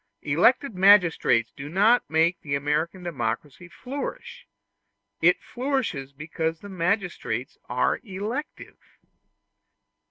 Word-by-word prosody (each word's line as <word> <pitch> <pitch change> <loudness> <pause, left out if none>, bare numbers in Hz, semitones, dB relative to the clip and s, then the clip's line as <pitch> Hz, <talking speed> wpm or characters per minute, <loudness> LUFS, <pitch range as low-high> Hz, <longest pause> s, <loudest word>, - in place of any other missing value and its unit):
Elected 230 - +3
magistrates 180 - +4
do 140 +1 -7
not 210 +8 +3
make 165 +3 +2
the 140 -2 -2
American 150 +6 -1
democracy 145 +1 -4
flourish; 265 +9 -7 0.7
it - - +4
flourishes 245 - -2
because 160 +3 -4
the 205 - -10
magistrates 175 - -2
are 125 0 +1
elective. 220 +8 -6
170 Hz, 95 wpm, -25 LUFS, 140-205 Hz, 0.7 s, magistrates